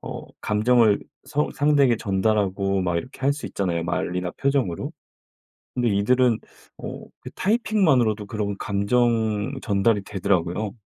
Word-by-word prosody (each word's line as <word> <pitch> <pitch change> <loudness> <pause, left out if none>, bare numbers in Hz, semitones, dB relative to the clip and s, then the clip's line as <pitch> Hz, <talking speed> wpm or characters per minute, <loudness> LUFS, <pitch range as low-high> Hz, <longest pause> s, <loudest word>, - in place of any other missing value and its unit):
어 - - -7 0.2
감정을 110 0 +3 0.2
서 150 +1 -1
상대에게 145 -4 +3
전달하고 100 -2 0
막 85 -1 0
이렇게 125 - -6
할 135 +1 +3
수 145 - -6
있잖아요, 85 -4 -2
말이나 90 +1 -2
표정으로. 135 -11 -1 0.8
근데 120 -2 +1
이들은 115 +3 +3 0.4
어 - - -7
그 - - -9
타이핑만으로도 160 - +2
그런 100 -2 -3
감정 110 +2 +1
전달이 105 0 +2
되더라고요. 95 +1 -1
105 Hz, 310 characters per minute, -24 LUFS, 100-125 Hz, 0.8 s, 감정을